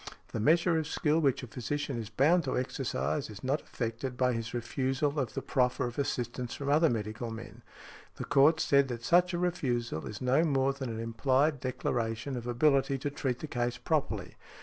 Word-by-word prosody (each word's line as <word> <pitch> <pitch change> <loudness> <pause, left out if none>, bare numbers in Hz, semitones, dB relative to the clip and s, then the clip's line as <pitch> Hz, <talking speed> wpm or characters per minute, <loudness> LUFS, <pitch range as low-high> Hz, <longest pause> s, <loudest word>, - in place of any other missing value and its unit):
The - - -4
measure 165 - +3
of 155 - -3
skill 155 0 +1
which 135 -4 +1
a - - -6
physician 135 +2 -3
is 110 -2 -6
bound 150 +9 +3
to 130 - -1
exercise 75 - -2
is 105 -1 -10
not 135 +4 0
affected 120 +2 -4
by 125 -1 +2
his 115 -1 -3
refusal 135 +4 -1
of 130 -5 -2
the - - -3
proffer 125 0 +1
of 120 +2 -5
assistance 125 -2 -2
from 140 -1 -4
other 155 +3 +5
medical 110 +1 -3
men. 115 +1 -9 0.5
The - - -5
Court 150 +4 +5
said 140 -2 +4
that 120 -2 -5
such 175 +6 +4
a 175 - -1
refusal 125 - -1
is 105 - -6
no 130 +5 +3
more 135 -3 +2
than 135 -2 -5
an 110 -1 -4
implied 130 +6 +1
declaration 120 0 -2
of 120 -1 -5
ability 135 +2 +2
to 140 +2 -3
treat 130 -3 -2
the 155 - -4
case 120 -2 -1
properly. 110 - -1
130 Hz, 195 wpm, -30 LUFS, 115-145 Hz, 0.5 s, other